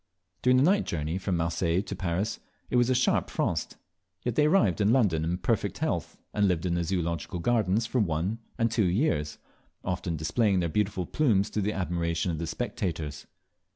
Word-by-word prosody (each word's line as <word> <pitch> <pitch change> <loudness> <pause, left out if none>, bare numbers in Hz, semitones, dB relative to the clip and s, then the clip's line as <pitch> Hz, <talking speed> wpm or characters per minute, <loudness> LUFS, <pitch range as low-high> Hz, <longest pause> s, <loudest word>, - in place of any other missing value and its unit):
During 125 +1 +4
the 130 - +5
night 195 +6 +3
journey 80 +2 -2
from 95 -2 -1
Marseilles 85 +2 0
to - - -5
Paris 95 +3 -2 0.3
it - - 0
was 120 0 +4
a 130 - +3
sharp 125 - +2
frost; - - -2 0.5
yet 120 - -1
they 150 +6 +3
arrived 110 - +3
in 105 +2 +4
London 100 -11 +3
in 85 +2 -1
perfect - - -1
health, - - -2 0.2
and 105 -1 +3
lived 90 -2 0
in 90 - 0
the 85 0 0
Zoological 85 0 -2
Gardens 110 +2 +1
for 125 +2 0
one, 95 +3 0 0.2
and 115 0 +1
two 115 -3 +2
years, 85 - 0 0.5
often 90 -2 -2
displaying 95 +6 +1
their 85 -2 0
beautiful 95 0 0
plumes 105 - +2
to 105 - -1
the 105 +2 0
admiration 85 -1 -1
of 80 - -4
the 85 - -3
spectators. 80 -5 -4
95 Hz, 190 wpm, -28 LUFS, 85-115 Hz, 0.5 s, the